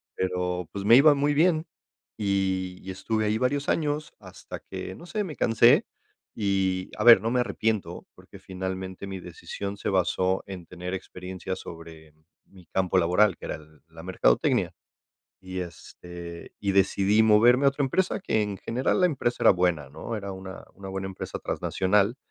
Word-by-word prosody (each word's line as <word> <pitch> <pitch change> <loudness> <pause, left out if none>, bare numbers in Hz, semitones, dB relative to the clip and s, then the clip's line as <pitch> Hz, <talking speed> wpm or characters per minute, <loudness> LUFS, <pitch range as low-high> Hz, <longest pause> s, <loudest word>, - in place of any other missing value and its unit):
pero, 90 -1 -2
pues, 100 -1 -5
me 115 +3 +8
iba 150 +2 +7
muy 145 +1 +1
bien 160 +1 +3 0.5
y 95 -3 -1
y 95 - -8
estuve 110 +3 -2
ahí 105 +1 +1
varios 140 +3 0
años 150 -1 -1
hasta 95 -3 -10
que, 95 - -7
no 170 - -12
sé, 210 +3 -2
me 155 -5 -7
cansé. 115 +1 +5 0.5
Y, 95 -3 0
a 105 - -1
ver, 120 -2 +9
no 115 - -1
me 125 0 +2
arrepiento, 105 -5 -2
porque - - -15
finalmente 95 0 -5
mi 95 -1 -6
decisión 95 +3 -6
se - - -3
basó 95 0 +1
en 95 -3 -8
tener 90 +1 -7
experiencias 95 0 -6
sobre 80 -2 -11 0.3
mi 95 -2 -18
campo 95 -1 0
laboral, 90 +4 +3
que - - -10
era - - -3
el 75 0 -16
la 80 0 -12
mercadotecnia, 85 -9 +2 0.7
y, 95 0 -6
este, 85 0 -9
y 100 -1 -1
decidí 100 +2 +3
moverme 120 +5 +5
a - - +7
otra 140 +1 -2
empresa 185 +8 0
que, 110 - +1
en 100 -2 -4
general, 125 - -1
la - - +6
empresa 125 -7 -1
era - - +8
buena, 90 -6 0
¿no?, 80 - -6
era 100 -1 -6
una 95 0 -9
una 95 -1 -9
buena 95 0 -4
empresa 95 - -6
transnacional, 100 +5 0
95 Hz, 170 wpm, -26 LUFS, 90-115 Hz, 0.7 s, ver